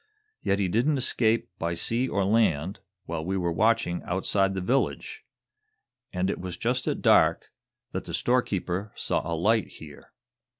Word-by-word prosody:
"Yet 100 - +1
he 100 -2 +1
didn't 125 - +1
escape, 115 -3 +1
by 85 +1 -1
sea 120 +9 -1
or 100 -2 0
land, 95 -5 +1 0.3
while 80 -2 -4
we 95 +3 -1
were 85 -2 0
watching 110 -1 +1
outside 95 +1 0
the - - -1
village. 125 +9 -1 0.9
And 90 0 -1
it - - -2
was 90 -2 -5
just 125 +2 -1
at - - -2
dark - - +4 0.4
that - - -4
the - - -7
storekeeper 100 -5 -1
saw - - -1
a 85 - -1
light 110 +6 +2
here. 75 -2 -13
95 Hz, 160 wpm, -27 LUFS, 90-115 Hz, 0.9 s, dark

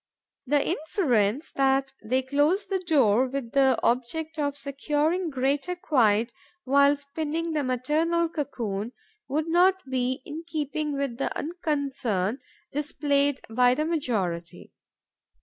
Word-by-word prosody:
The 285 +1 +2
inference 290 - 0
that 270 0 +1
they 255 +4 0
close 290 +9 +2
the 385 -1 -1
door 265 - +3
with 255 -3 -4
the 270 -2 +4
object 310 +7 -1
of 285 -1 -1
securing 295 +5 -1
greater 280 +5 0
quiet 235 -9 +2 0.3
while 280 +2 +4
spinning 315 +3 -3
the 300 -2 0
maternal 305 +7 +1
cocoon 240 - -4 0.3
would 305 +4 -1
not 365 0 +3
be 255 0 -1
in 315 +3 -7
keeping 300 -1 -2
with 275 -4 -3
the - - -1
unconcern 275 - -2 0.3
displayed 285 -1 0
by 245 +2 +3
the 305 - 0
majority. 195 - -2
280 Hz, 120 wpm, -26 LUFS, 255-310 Hz, 0.3 s, the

